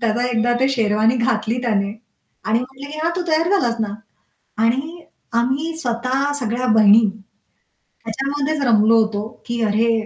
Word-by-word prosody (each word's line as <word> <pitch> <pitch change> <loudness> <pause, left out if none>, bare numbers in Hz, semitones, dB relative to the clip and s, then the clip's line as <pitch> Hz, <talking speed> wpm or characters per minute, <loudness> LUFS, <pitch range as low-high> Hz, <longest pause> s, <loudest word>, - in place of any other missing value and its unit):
त्याचा 235 +1 0
एकदा 240 -1 +1
ते 265 - +3
शेरवानी 225 -2 +2
घातली 230 0 0
त्याने 200 -4 0 0.5
आणि 220 +2 +2
म्हटलं 265 +2 -8
की 305 - -7
"हां, 335 - +1
तू 360 - -1
तयार 320 +2 +2
झालास 235 -7 0
ना." 205 -2 -2 0.7
आणि 295 +9 -1 0.4
आम्ही 280 +7 -1
स्वतः 255 +1 -1
सगळ्या 245 +1 -2
बहिणी, 220 0 +6 1.0
त्याच्यामध्येच 280 +5 -2
रमलो 225 0 +5
होतो 210 -1 -4 0.2
की 235 0 -3
अरे 230 +2 +2
235 Hz, 145 wpm, -20 LUFS, 220-275 Hz, 1.0 s, बहिणी